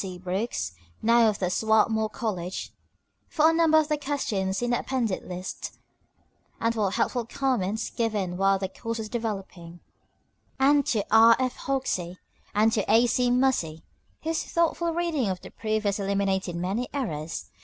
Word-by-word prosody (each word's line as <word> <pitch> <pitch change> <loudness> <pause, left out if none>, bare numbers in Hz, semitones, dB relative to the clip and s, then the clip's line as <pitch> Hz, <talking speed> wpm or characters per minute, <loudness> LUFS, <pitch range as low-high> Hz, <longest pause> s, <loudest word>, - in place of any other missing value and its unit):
C. 185 -2 -6
Brooks, 185 - -2 0.3
now 230 0 +5
of 210 - -2 0.2
Swarthmore 220 0 +2
College, 190 -6 -4 0.5
for 315 +1 +4
a - - -1
number 325 -1 +4
of 310 -1 +3
the 300 -1 0
questions 220 -9 -1
in 240 - 0
the 240 - +2
appended 235 -8 -1
list, 180 +1 -6 0.8
and 230 0 +1
for 215 -4 +1
helpful 240 +5 0
comments 225 -4 -1
given 210 -6 -1
while 195 +1 +3
the 190 0 -2
course 230 +4 -5
was 220 -1 -5
developing; 195 -7 -5 0.8
and 280 +1 +4
to 215 -4 +1
R. 225 +1 +8
F. 255 -1 -1
Hoxie 185 -10 -1 0.4
and 215 +2 +4
to 210 - +1
A. 230 +2 +6
C. 245 +1 +2
Muhse, 245 -11 +1 0.4
whose 320 +1 -1
thoughtful 335 0 0
reading 325 - 0
of 185 -1 -2
the - - -11
proof 215 -1 -2
has 200 0 0
eliminated 195 -2 0
many 195 +8 -2
errors. 165 - -4
220 Hz, 155 wpm, -26 LUFS, 190-255 Hz, 0.8 s, R